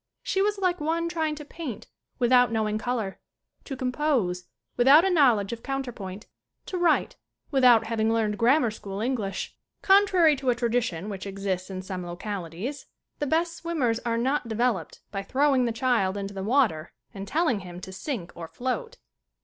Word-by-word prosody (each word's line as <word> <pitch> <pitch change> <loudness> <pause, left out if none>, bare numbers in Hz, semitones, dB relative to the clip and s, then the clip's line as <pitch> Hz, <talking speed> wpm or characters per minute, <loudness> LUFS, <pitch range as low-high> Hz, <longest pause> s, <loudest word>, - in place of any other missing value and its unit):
She 385 - 0
was 415 +1 +1
like 365 -3 0
one 330 +2 0
trying 320 -3 -1
to 300 0 -9
paint 295 -7 -7 0.3
without 245 0 +4
knowing 215 -1 0
color, 225 -5 -3 0.5
to 270 - -6
com 255 -1 -1
pose 240 -12 0 0.3
without 280 +8 +6
a 385 - +2
knowledge 240 - +3
of 230 - -7
counter 270 -1 -3
point, 195 -1 -8 0.4
to 370 - -4
write 345 -3 +2 0.3
without 250 -5 +5
having 225 -1 0
learned 215 -3 0
grammar 245 0 +4
school 200 -2 -7
English. 220 -5 -2 0.3
Contrary 380 -5 +5
to 260 -1 -1
a 245 - +3
tradition 230 -7 -1
which 200 -1 -6
exists 195 -2 -3
in 185 -1 -5
some 185 -1 -5
localities 185 - -5 0.3
the 290 - -1
best 335 +3 +1
swimmers 285 -10 -1
are 235 -1 -1
not 260 +2 0
developed 220 -7 -1
by 195 - -3
throwing 265 +4 +2
the 235 - 0
child 225 -5 +1
into 200 0 -5
the 195 - -5
water 210 - +1 0.2
and 195 0 -7
telling 305 - +1
him 180 -2 -9
to 190 - -8
sink 190 - -5
or 165 -1 -8
float. 455 - -4
240 Hz, 175 wpm, -26 LUFS, 200-290 Hz, 0.5 s, without